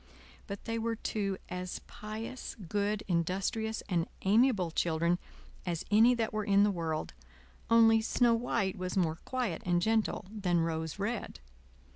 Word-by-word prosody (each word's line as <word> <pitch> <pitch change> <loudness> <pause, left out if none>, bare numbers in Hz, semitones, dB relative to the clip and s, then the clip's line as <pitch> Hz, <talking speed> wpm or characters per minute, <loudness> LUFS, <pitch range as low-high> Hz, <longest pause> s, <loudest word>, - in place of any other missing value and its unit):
But 200 0 -7
they 230 0 -2
were 230 0 -1
two 200 -3 -2
as 180 0 -4
pious, 220 +4 -7
good, 205 +2 -2
industrious, 195 +6 -1
and 175 -3 0 0.2
amiable 205 -3 +3
children 170 +2 +1 0.4
as 170 -3 -3
any 230 +4 +6
that 225 -2 -1
were 215 0 -1
in 200 0 +4
the 205 - +3
world, 165 -4 -3 0.6
only 225 -1 +6
Snow 235 +1 +3
White 205 -5 0
was 185 +1 -3
more 165 -3 +1
quiet 245 -10 -2
and 175 -1 +2
gentle 220 +2 +1
than 180 -6 +1
Rose 160 -1 -2
Red. 210 +3 -3
200 Hz, 145 wpm, -31 LUFS, 175-225 Hz, 0.6 s, any